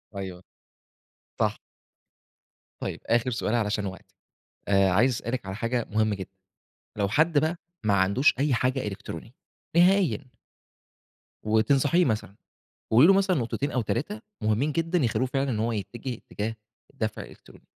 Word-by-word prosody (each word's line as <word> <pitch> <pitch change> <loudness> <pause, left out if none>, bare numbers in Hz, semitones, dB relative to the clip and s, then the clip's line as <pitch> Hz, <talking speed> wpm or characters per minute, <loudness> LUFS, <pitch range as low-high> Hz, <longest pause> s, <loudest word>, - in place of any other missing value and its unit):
أيوه، 95 -2 -6 1.0
صح. - - +2 1.2
طيب - - -4
آخر 120 +2 +2
سؤال 115 0 -1
علشان 105 -2 0
وقتِك، 95 0 -7 0.6
آآ 100 -1 +4
عايز 115 +8 +4
أسألِك 115 -2 -3
على 95 +1 -5
حاجة 115 +1 -1
مهمة 110 0 +1
جدًا، 95 -1 -7 0.7
لو 100 -2 0
حد 155 +5 +3
بقى 160 +3 0 0.3
ما 105 -2 +2
عندوش 100 +10 +4
أي 145 0 +2
حاجة 130 -1 0
إلكترونية 95 +1 -7 0.4
نهائيًا؟ 175 -7 +3 1.1
وتنصحيه 135 +10 +3
مثلًا، 105 -3 -2 0.6
وقولي 125 +8 +7
له - - +8
مثلًا 190 -2 +3
نقطتين 135 +3 -1
أو 125 - +1
3 155 - -2 0.2
مُهمين 110 +8 +1
جدًا، 165 +2 0
يخلّوه 130 -1 +1
فعلًا 135 +1 -1
إن 110 - -1
هو 115 +1 0
يتجه 115 +5 -4
اتجاه 110 +2 -4 0.4
الدفع - - -3
الإلكتروني. - - -15
120 Hz, 140 wpm, -26 LUFS, 105-140 Hz, 1.2 s, له